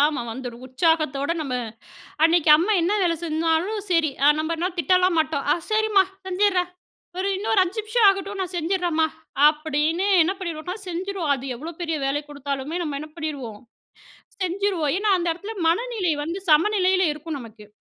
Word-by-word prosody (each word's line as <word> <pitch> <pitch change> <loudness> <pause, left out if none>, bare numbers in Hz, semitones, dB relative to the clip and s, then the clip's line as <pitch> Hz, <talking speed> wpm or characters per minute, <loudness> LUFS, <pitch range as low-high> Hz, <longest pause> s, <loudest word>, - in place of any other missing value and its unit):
ஆ - - +5
ஆமா. 300 -5 -3
வந்துடும் 245 0 -8
உற்சாகத்தோட 285 +1 +1
நம்ம 265 -4 -4 0.7
அன்னைக்கு 330 -1 +4
அம்மா 355 +7 +1
என்ன 355 +5 +1
வேலை 335 -1 +2
செஞ்சாலும் 330 +6 0
சரி, 330 -4 +2 0.3
நம்ம 315 +2 -1
என்ன 350 +3 -1
திட்டலாம் 365 -1 +3
மாட்டோம் 310 -3 -1 0.2
"சரிம்மா 430 -2 +4 0.2
செஞ்சிட்றேன். 370 -1 +1 0.5
ஒரு 385 +2 0
இன்னொரு 430 0 +1
5 370 +5 -4
நிமிஷம் 435 0 +3
ஆகட்டும் 390 +1 -2
நான் 370 -1 -4
செஞ்சிறேன்மா." 340 -2 0 0.4
அப்டின்னு 310 +4 0
என்ன 330 +4 +2
பண்ணிடுவோம்னா, 345 0 -5
செஞ்சுடுவோம். 360 -3 -2
அது 270 0 -8
எவ்ளோ 320 +6 -7
பெரிய 325 -2 -1
வேலை 280 +2 0
கொடுத்தாலுமே 285 +2 -4
நம்ம 295 -3 -3
என்ன 305 +1 -8
பண்ணிடுவோம்? 275 -10 -5 0.8
செஞ்சுருவோம். 370 -4 0
ஏன்னா 410 +1 +1
அந்த 345 - -2
இடத்துல 410 +6 -8
மனநிலை 405 -2 0
வந்து 340 +5 -4
சமநிலையில 375 +3 +3
இருக்கும் 305 0 -6
நமக்கு. 220 -3 -12
335 Hz, 150 wpm, -23 LUFS, 300-380 Hz, 0.8 s, ஆ